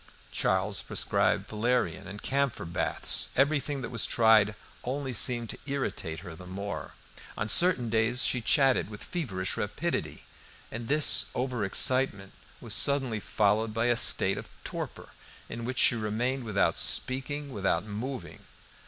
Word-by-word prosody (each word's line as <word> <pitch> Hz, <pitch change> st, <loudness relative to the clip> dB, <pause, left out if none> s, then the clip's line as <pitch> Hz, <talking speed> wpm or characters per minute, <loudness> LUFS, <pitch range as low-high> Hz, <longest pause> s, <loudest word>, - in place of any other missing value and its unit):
Charles -, -, 0 dB
prescribed -, -, -1 dB
valerian 110 Hz, -6 st, -1 dB
and 100 Hz, +2 st, -9 dB
camphor 140 Hz, -7 st, -1 dB
baths. 85 Hz, +1 st, 0 dB
Everything 140 Hz, 0 st, 0 dB
that 115 Hz, -, -6 dB
was 115 Hz, -3 st, +2 dB
tried 110 Hz, -2 st, +3 dB, 0.3 s
only 135 Hz, +1 st, -4 dB
seemed 120 Hz, 0 st, +2 dB
to -, -, -10 dB
irritate 95 Hz, -, -4 dB
her 85 Hz, -2 st, -9 dB
the 90 Hz, +2 st, -12 dB
more. 95 Hz, -4 st, -6 dB, 0.4 s
On 105 Hz, -, -2 dB
certain 165 Hz, -2 st, +5 dB
days 115 Hz, +2 st, +1 dB
she 125 Hz, -, +1 dB
chatted 135 Hz, -1 st, +2 dB
with 105 Hz, -1 st, -10 dB
feverish 100 Hz, -, -4 dB
rapidity, 145 Hz, +12 st, -4 dB, 0.5 s
and 115 Hz, +1 st, -6 dB
this 150 Hz, +2 st, +4 dB
over 125 Hz, -3 st, -2 dB
excitement 100 Hz, -1 st, +2 dB, 0.3 s
was -, -, -3 dB
suddenly 135 Hz, -6 st, +3 dB
followed 105 Hz, +2 st, 0 dB
by 115 Hz, +1 st, 0 dB
a -, -, -3 dB
state -, -, +5 dB
of -, -, -11 dB
torpor, -, -, -7 dB, 0.4 s
in 115 Hz, +1 st, -7 dB
which 125 Hz, +1 st, -5 dB
she -, -, +5 dB
remained 120 Hz, +4 st, -2 dB
without 105 Hz, -2 st, +1 dB
speaking, 140 Hz, +2 st, 0 dB
without 95 Hz, -4 st, -1 dB
moving. 115 Hz, +5 st, -7 dB
115 Hz, 145 wpm, -28 LUFS, 105-130 Hz, 0.5 s, certain